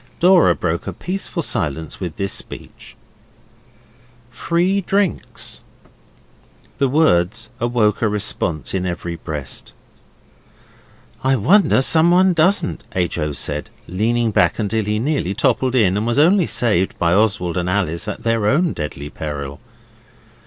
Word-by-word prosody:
Dora 180 0 +5
broke 85 +1 -3
a 100 - -4
peaceful 180 - -3
silence 80 - -2
with 90 -4 -5
this 100 -1 -1
speech - - -8 1.4
'Free 175 +10 0
drinks.' 125 - -2 1.2
The 135 - +2
words 115 - +1
awoke 115 -3 +1
a 115 - +2
response 85 -6 -1
in 90 -1 -1
every 85 -1 -4
breast. 75 -4 -7 1.5
'I 135 +1 +3
wonder 130 - +4
someone 175 +5 +4
doesn't,' 170 +1 +1
H. 90 -2 -1
O. 75 -1 -1
said, 70 - -3 0.2
leaning 115 +5 0
back - - +2
till 110 0 0
he 105 +1 -1
nearly 115 - -1
toppled 130 -1 +1
in, 100 -7 +3
and 105 +3 -1
was 120 - 0
only 175 +4 +4
saved 105 -6 +1
by 85 0 +1
Oswald 100 -4 +1
and 90 0 -1
Alice 90 -2 -1
at 105 - -6
their 115 -2 +1
own 160 +8 +2
deadly 75 -2 -6
peril. 75 -2 -6
110 Hz, 130 wpm, -19 LUFS, -, 1.5 s, Dora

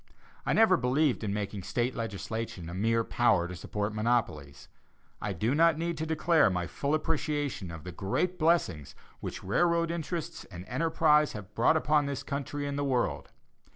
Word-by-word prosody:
I - - +3
never 220 -5 +5
believed 130 0 +1
in 105 - -1
making 100 -1 -3
State 120 +6 -1
legislation 110 -5 -4
a - - -7
mere 115 +4 +1
power 100 -8 +2
to 90 - -7
support 105 +4 -3
monopolies. 90 - -1 0.5
I 105 - -2
do 110 +7 0
not 165 +1 +4
need 170 +1 -2
to 160 - -2
declare 160 - +3
my 90 -2 -1
full 140 - -1
appreciation 150 - -2
of 80 -2 -8
the 90 - -6
great 105 - -1
blessings 155 - +1 0.2
which - - -6
railroad 170 - +2
interests 170 -1 -4
and 90 -1 -10
enterprises 150 +3 +2
have 105 -1 -9
brought 120 +9 +4
upon 150 -2 +2
this 140 -2 -3
country 145 0 -4
and 140 0 -3
the - - 0
world. 130 -3 -1
125 Hz, 170 wpm, -29 LUFS, 100-155 Hz, 0.5 s, never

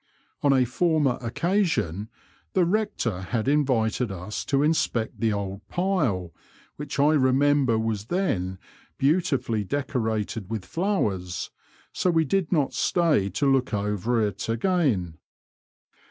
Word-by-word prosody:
On 140 - +3
a 130 -2 +4
former 150 0 +1
occasion 120 - 0 0.4
the 185 - +3
Kector 165 - -1
had 115 +3 -2
invited 125 -6 +1
us 95 +3 -5
to 140 0 +2
inspect 150 -7 0
the 115 -2 +2
old 100 -1 -3
pile, 145 - 0 0.4
which 145 -1 -6
I 145 +2 +4
remember 135 -2 +3
was 110 -2 -2
then 100 - -1 0.4
beautiftdly 135 - +1
decorated 110 -7 -2
with 110 -4 -4
flowers, 105 - -2 0.4
so 185 - +1
we 165 -2 +3
did 190 +3 0
not 150 -6 +1
stay 155 - +2
to 140 - -1
look 135 -4 +2
over 105 +3 0
it 105 +2 -4
again. 115 - 0
125 Hz, 125 wpm, -25 LUFS, 105-155 Hz, 0.4 s, a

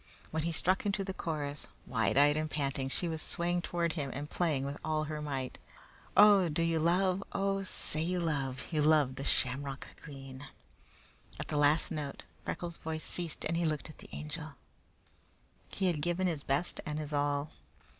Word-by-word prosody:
When 160 - 0
he 170 +2 0
struck 185 +3 +2
into 200 0 0
the 190 0 -4
chorus, 150 -5 -3 0.2
wide 115 +1 +1
eyed 145 +1 +6
and 155 0 -1
panting, 135 -3 -1
she 175 - -1
was 160 -1 -2
swaying 175 +1 0
toward 170 -2 -1
him 145 -5 -2
and 145 +2 -4
playing 150 -5 0
with 140 +1 -4
all 155 0 0
her 155 0 -4
might. 135 -4 -3 0.6
"Oh, 200 -4 +8
do 160 +2 +1
you 165 -1 +2
love? 185 +3 +2
Oh, 195 0 +1
say 155 -4 0
you 180 +2 0
love 140 -6 -1
You 155 -2 +2
love 150 -3 +4
the 135 - -6
shamrock 135 0 +3
green!" 135 -1 -9 0.9
At - - -5
the 150 - 0
last 145 +2 +4
note, 150 -3 -4 0.2
Freckles' 170 -1 -4
voice 160 0 -4
ceased 170 -3 -4
and 165 - 0
he 170 - +1
looked 155 0 -1
at - - -19
the - - -12
Angel. 150 0 -5 1.2
He 190 - -2
had 170 -5 +2
given 175 +4 0
his 165 -5 0
best 140 +6 -1
and 150 -1 -3
his 155 -1 -3
all. 145 0 0
155 Hz, 185 wpm, -32 LUFS, 145-170 Hz, 1.2 s, Oh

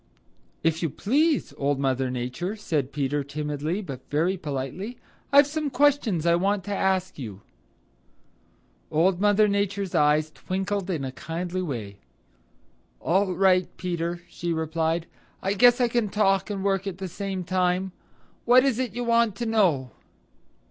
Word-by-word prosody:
"If 160 0 +1
you 165 - 0
please, 290 - +1
Old 140 0 0
Mother 130 -1 0
Nature," 125 - -3
said 155 -10 -2
Peter 145 0 -1
timidly 150 +6 -3
but 135 -7 -7
very 165 +6 +1
politely, 160 - -5 0.3
"I've 280 +1 +8
some 300 +1 -2
questions 270 - +2
I 170 - +4
want 195 +3 +1
to 205 +2 -3
ask 190 -3 0
you." 105 -6 -7 1.5
Old 175 +4 +2
Mother 210 +1 +4
Nature's 200 -1 -1
eyes 150 +1 +3
twinkled 195 +3 -3
in 155 -7 -2
a 130 - -4
kindly 170 +7 -4
way. 110 - -5 1.0
"All 185 +2 +1
right, 185 0 +4
Peter," 175 -1 -3
she 170 0 -4
replied. 160 +1 -1 0.3
"I 195 - -1
guess 245 +4 +5
I 245 - +4
can 235 -3 0
talk 195 -1 +2
and 200 -2 -3
work 195 0 0
at 185 -3 -4
the 190 0 -5
same 190 +1 -4
time. 185 +1 0 0.5
What 250 +2 +6
is 260 -3 +1
it 245 -5 -2
you 245 - -2
want 235 -3 +2
to 240 - -3
know?" 175 - +2
185 Hz, 150 wpm, -25 LUFS, 155-205 Hz, 1.5 s, I've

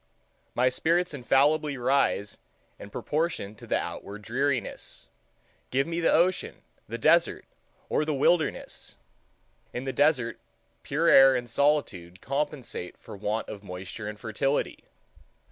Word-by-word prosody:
My 125 +1 +3
spirits 170 +6 +1
infallibly 145 +2 +2
rise 120 -5 +1 0.4
in 100 - -9
proportion 150 - -2
to 110 - -14
the - - +2
outward 105 +1 -6
dreariness. 130 +3 -2 0.6
Give 135 +2 +1
me 165 +1 -3
the 165 - +3
ocean, 180 +3 +1 0.2
the - - -4
desert, - - +3 0.4
or - - +1
the 155 - -1
wilderness! 155 - 0 0.8
In 120 - -4
the 135 -1 -3
desert, 135 -4 +2 0.4
pure - - 0
air 135 0 +8
and 120 -1 -2
solitude 115 - 0
compensate 140 - -4
for - - -11
want 105 +2 -2
of 100 - -7
moisture 95 +3 -7
and 105 0 -6
fertility. 120 +6 -1
135 Hz, 130 wpm, -27 LUFS, 105-150 Hz, 0.8 s, air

